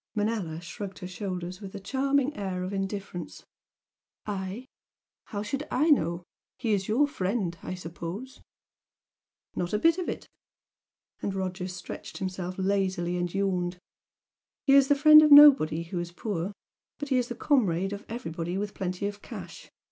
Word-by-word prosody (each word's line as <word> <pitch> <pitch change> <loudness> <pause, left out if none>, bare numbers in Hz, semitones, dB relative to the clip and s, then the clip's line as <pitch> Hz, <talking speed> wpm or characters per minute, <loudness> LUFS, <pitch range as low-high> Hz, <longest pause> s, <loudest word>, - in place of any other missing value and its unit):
Manella 205 -7 -1
shrugged 190 +2 -7
her 180 - -7
shoulders 185 -1 -5
with 195 0 -8
a - - -5
charming 275 +5 0
air 190 -3 -3
of 185 +2 -4
indifference. 195 -2 -5 0.8
"I? 200 +3 -4 0.6
How 205 -2 -4
should 275 +7 -3
I 305 +5 +2
know? 170 - +2 0.3
He 225 -4 0
is 195 -1 0
your 260 +7 +3
friend 190 -7 -2
I 185 - -5
suppose?" 180 +8 -7 1.1
"Not 175 +2 -2
a - - +3
bit 330 - +3
of 360 - -2
it!" - - -5 0.9
and 195 - -2
Roger 185 -1 -3
stretched 180 -1 -8
himself 185 -1 -4
lazily 190 -2 0
and 175 -1 -1
yawned 185 -2 -1 0.9
"He's 275 -1 +6
the 285 - +4
friend 305 +2 +9
of 305 -1 +4
nobody 270 - +8
who 175 +1 -4
is 175 0 -4
poor. 185 0 -3 0.5
But 290 - -5
he's 250 -3 +2
the 240 - -5
comrade 200 - +1
of 200 +1 -7
everybody 175 -6 -4
with 205 +1 -3
plenty 185 0 -3
of 205 0 -4
cash. - - -9
195 Hz, 155 wpm, -28 LUFS, 180-240 Hz, 1.1 s, friend